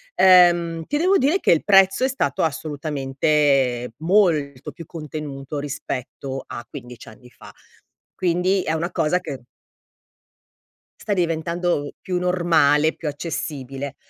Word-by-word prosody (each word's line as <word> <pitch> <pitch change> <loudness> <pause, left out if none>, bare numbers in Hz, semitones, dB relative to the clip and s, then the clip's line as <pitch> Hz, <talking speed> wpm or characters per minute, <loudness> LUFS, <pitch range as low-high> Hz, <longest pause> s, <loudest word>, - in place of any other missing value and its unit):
ehm, 175 -3 +5
ti 290 - -2
devo 370 +5 +3
dire 295 +9 +2
che - - +2
il 160 - 0
prezzo 195 +2 +4
è 260 - +2
stato 140 - -1
assolutamente 140 -4 0
molto 160 -7 +1
più 165 - -10
contenuto 150 -3 -7
rispetto 135 -1 -6
a 120 - -8
15 125 -4 -10
anni 125 +3 -15
fa. - - -15 0.6
Quindi 185 +2 +1
è 160 - -2
una 165 +3 -2
cosa 160 +4 +1
che 145 -8 -7 1.6
sta 205 - -1
diventando 170 -3 -1
più 180 -2 -2
normale, 160 -4 +2
più 160 - -7
accessibile. 140 -3 -5
155 Hz, 125 wpm, -22 LUFS, 140-180 Hz, 1.6 s, ehm